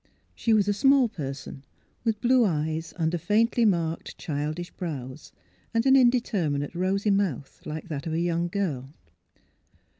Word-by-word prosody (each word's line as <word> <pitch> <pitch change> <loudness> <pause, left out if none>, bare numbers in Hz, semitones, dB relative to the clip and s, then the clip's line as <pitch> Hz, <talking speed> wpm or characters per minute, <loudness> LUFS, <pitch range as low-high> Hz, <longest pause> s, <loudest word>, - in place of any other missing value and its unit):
She 230 - -1
was 210 -2 +4
a 205 - +3
small 270 +4 +4
person, 140 -7 -7 0.4
with 225 -3 -1
blue 250 0 +4
eyes 160 -3 -1
under 165 0 0
faintly 225 +7 +2
marked, 165 -5 0
childish 155 +3 -4
brows, 145 -5 -6 0.4
and 230 - +2
an 265 0 +6
indeter 240 - +3
minate, 145 +1 -2
rosy 195 +4 0
mouth, 185 - -1
like 155 +3 -6
that 145 -1 -4
of 160 - -2
a 165 - 0
young 170 0 0
girl. 155 -8 -3
175 Hz, 150 wpm, -26 LUFS, 155-210 Hz, 0.4 s, an